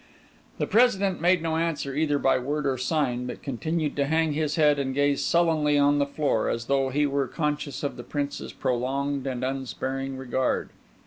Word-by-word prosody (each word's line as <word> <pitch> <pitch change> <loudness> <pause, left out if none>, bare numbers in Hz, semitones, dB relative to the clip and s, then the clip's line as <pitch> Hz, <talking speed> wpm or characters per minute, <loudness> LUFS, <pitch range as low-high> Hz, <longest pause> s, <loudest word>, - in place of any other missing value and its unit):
The - - 0
President 200 -6 +3
made 175 -1 +3
no 160 -1 0
answer 160 -4 -1
either 145 0 +1
by 135 -2 +2
word 145 +3 -2
or 135 -1 +1
sign; 130 -2 -1
but - - -7
continued 155 +3 -2
to 140 -1 +1
hang 160 0 +1
his 150 0 -1
head 150 -2 +4
and 135 -1 -2
gaze 145 0 +2
sullenly 160 -4 +2
on 145 0 +4
the 140 - +1
floor, 140 -5 0
as 115 0 -2
though 135 0 +1
he 145 +3 +1
were 140 -1 0
conscious 150 0 -3
of 145 - -3
the - - -7
Prince's 145 -1 -4
prolonged 135 +2 -1
and 130 -1 -3
unsparing 135 0 -3
regard. 130 0 -1
145 Hz, 185 wpm, -26 LUFS, 135-155 Hz, -, head